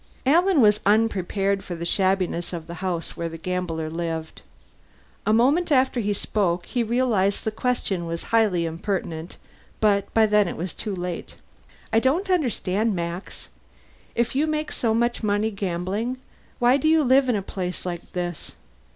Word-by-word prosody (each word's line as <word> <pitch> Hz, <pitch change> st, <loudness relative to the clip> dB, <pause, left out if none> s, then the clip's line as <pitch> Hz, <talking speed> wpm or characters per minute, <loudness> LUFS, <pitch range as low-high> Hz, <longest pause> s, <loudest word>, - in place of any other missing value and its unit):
Alan 340 Hz, +3 st, +4 dB
was 210 Hz, -1 st, +5 dB
unprepared 200 Hz, -2 st, +1 dB
for 175 Hz, -, -5 dB
the 170 Hz, 0 st, -5 dB
shabbiness 185 Hz, -2 st, 0 dB
of 165 Hz, -2 st, -5 dB
the 170 Hz, -, -8 dB
house 175 Hz, -3 st, -2 dB
where 170 Hz, 0 st, -3 dB
the 165 Hz, -, -8 dB
gambler 170 Hz, -2 st, -3 dB
lived. 165 Hz, -1 st, -4 dB, 0.9 s
A -, -, +4 dB
moment 280 Hz, +10 st, +3 dB
after 260 Hz, -2 st, +3 dB
he 210 Hz, -2 st, 0 dB
spoke, 185 Hz, -3 st, 0 dB
he 245 Hz, -, -1 dB
realized 225 Hz, -4 st, +1 dB
the 220 Hz, -, -1 dB
question 215 Hz, -7 st, -1 dB
was 165 Hz, 0 st, -4 dB
highly 205 Hz, -7 st, +3 dB
impertinent, 165 Hz, -1 st, -4 dB, 0.4 s
but 200 Hz, -2 st, +2 dB
by 225 Hz, -1 st, +6 dB
then 210 Hz, -2 st, +3 dB
it -, -, -5 dB
was 175 Hz, +2 st, -4 dB
too 210 Hz, -3 st, -4 dB
late: 180 Hz, -1 st, -5 dB, 0.6 s
"I 225 Hz, -, +6 dB
don't 330 Hz, -, +1 dB
understand, 225 Hz, -, +1 dB
Max. 170 Hz, +2 st, -5 dB, 0.7 s
If 235 Hz, 0 st, 0 dB
you 300 Hz, +3 st, +2 dB
make 305 Hz, 0 st, -2 dB
so 225 Hz, -2 st, 0 dB
much 235 Hz, +1 st, +1 dB
money 210 Hz, 0 st, +1 dB
gambling, 200 Hz, +5 st, -2 dB, 0.4 s
why 245 Hz, +2 st, +4 dB
do 285 Hz, -, 0 dB
you 315 Hz, -1 st, +5 dB
live 260 Hz, 0 st, +4 dB
in 240 Hz, -, +3 dB
a 200 Hz, -, -1 dB
place 180 Hz, -2 st, -4 dB
like 175 Hz, -2 st, -5 dB
this? 175 Hz, -2 st, -4 dB
205 Hz, 165 wpm, -24 LUFS, 175-240 Hz, 0.9 s, by